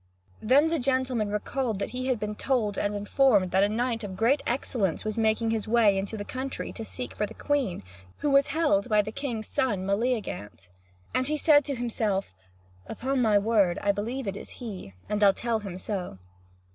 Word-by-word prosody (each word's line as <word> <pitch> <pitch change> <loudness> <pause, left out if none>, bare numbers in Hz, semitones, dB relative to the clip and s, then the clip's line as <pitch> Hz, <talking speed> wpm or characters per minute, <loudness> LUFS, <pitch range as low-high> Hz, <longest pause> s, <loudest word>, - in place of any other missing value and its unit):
Then 275 +8 +4
the 330 -1 0
gentleman 255 -4 0
recalled 220 +2 -2
that 200 - -3
he 255 +1 -3
had 255 -4 +1
been 210 0 -3
told 215 -3 0
and 205 +1 -1
informed 205 -2 +3
that 190 +1 +4
a 205 - +3
knight 230 +1 -1
of 190 -2 -6
great 245 +7 +3
excellence 235 - -1
was 215 -1 -2
making 225 0 +1
his 220 -2 -2
way 220 -3 +4
into 200 +3 -3
the 205 - -5
country 260 +3 -4
to 225 - -6
seek 125 - -6
for 210 - -1
the 225 - -12
Queen, 275 - -1 0.3
who 295 - 0
was 275 0 +5
held 300 -4 +1
by 210 -1 +4
the 215 - -5
king's 235 -4 -4
son, 230 -10 -1
Meleagant; 200 - -2 0.4
and 255 0 +1
he 305 +1 0
said 295 -1 +5
to 280 - -2
himself: 215 - -1 0.5
"Upon 265 +1 -1
my 215 -3 +4
word, 200 -4 +2
I 205 - +4
believe 230 +6 -3
it 195 -1 -3
is - - -8
he, 195 - -8
and 210 0 -1
I'll 200 -1 +6
tell 235 -2 -1
him 195 -4 -7
so." 185 - -4
220 Hz, 195 wpm, -27 LUFS, 205-260 Hz, 0.5 s, I'll